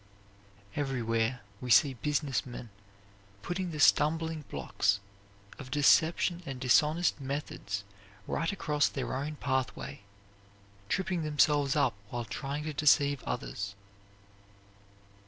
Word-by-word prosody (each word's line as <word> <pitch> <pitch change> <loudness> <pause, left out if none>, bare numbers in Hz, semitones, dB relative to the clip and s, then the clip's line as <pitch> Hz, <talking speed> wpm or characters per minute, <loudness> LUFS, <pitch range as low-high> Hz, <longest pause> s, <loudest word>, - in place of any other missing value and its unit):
Everywhere 120 -3 0 0.2
we 125 - -5
see 135 +2 +6
business 145 +1 -1
men 120 -3 -9 0.7
putting 180 - -2
the 155 -2 -6
stumbling 160 +1 +3
blocks 95 +8 0 0.6
of 135 -3 -8
deception 160 +5 +3
and 135 -5 -6
dishonest 150 +6 +3
methods 130 -7 -4 0.4
right 165 - -1
across 150 -7 +1
their 130 -2 -3
own 145 +3 -3
pathway, 130 -9 -2 0.9
tripping 190 -2 0
themselves 150 -2 +2
up 140 -6 +3 0.2
while 120 0 -4
trying 135 +8 -4
to 155 0 -4
deceive 145 -2 +3
others. 100 +12 -4
140 Hz, 105 wpm, -30 LUFS, 125-155 Hz, 0.9 s, see